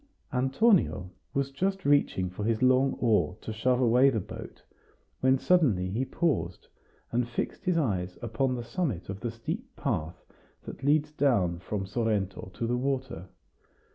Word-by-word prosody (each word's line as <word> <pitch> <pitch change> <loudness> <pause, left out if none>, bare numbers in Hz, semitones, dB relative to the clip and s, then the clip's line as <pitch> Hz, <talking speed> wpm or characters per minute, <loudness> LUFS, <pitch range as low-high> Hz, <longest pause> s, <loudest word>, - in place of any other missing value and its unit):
Antonio 135 - +2 0.2
was 140 0 -1
just 190 +7 -1
reaching 140 -10 +3
for 95 +3 -5
his 115 +2 0
long 130 +1 +4
oar 105 -5 +1
to 110 - -5
shove 125 +3 +1
away 125 +2 +5
the 115 -5 0
boat, 90 - -9 0.6
when 130 +1 +4
suddenly 125 - +2
he 120 +6 -1
paused, 95 - -1 0.4
and 120 0 0
fixed 120 - -4
his 180 -2 +2
eyes 95 - -1
upon 120 +3 -1
the 120 - -4
summit 120 - -3
of 95 0 -5
the 120 - -3
steep 115 +1 -6
path 80 +3 -3 0.4
that - - -9
leads 150 +1 +2
down 110 - +1
from 95 +2 -4
Sorrento 105 -3 -1
to 115 - -2
the 120 +1 0
water. 130 -8 -2
120 Hz, 155 wpm, -28 LUFS, 100-135 Hz, 0.6 s, away